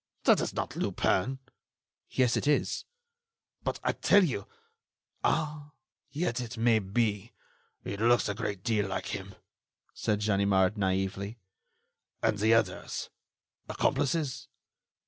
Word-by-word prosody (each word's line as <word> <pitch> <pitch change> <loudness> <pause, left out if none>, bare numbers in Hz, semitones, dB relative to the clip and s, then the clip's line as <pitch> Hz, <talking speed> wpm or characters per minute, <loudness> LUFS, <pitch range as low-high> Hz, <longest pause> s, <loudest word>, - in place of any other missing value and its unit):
"That - - +5
is - - -3
not - - -3
Lupin." 130 +9 0 0.7
"Yes, 125 -2 +2
it - - -1
is." 150 - +1 0.8
"But - - -2
I - - +2
tell 205 0 +4
you.... 150 -8 -2 0.8
Ah! 150 -2 -1 0.4
yet, 140 -5 -1
it 115 -1 -6
may 115 -1 +4
be. 105 +2 -1 0.5
It 100 +1 -5
looks 120 +1 +4
a 105 - -1
great 100 -1 -4
deal 105 -3 +1
like 95 - -3
him," - - -6 0.6
said 105 -1 -1
Ganimard, 100 -2 +3
naively. 95 +2 -1 0.9
"And 110 -2 +2
the 110 +2 +3
others—accomplices?" 140 +5 -1
110 Hz, 115 wpm, -30 LUFS, 100-130 Hz, 0.9 s, That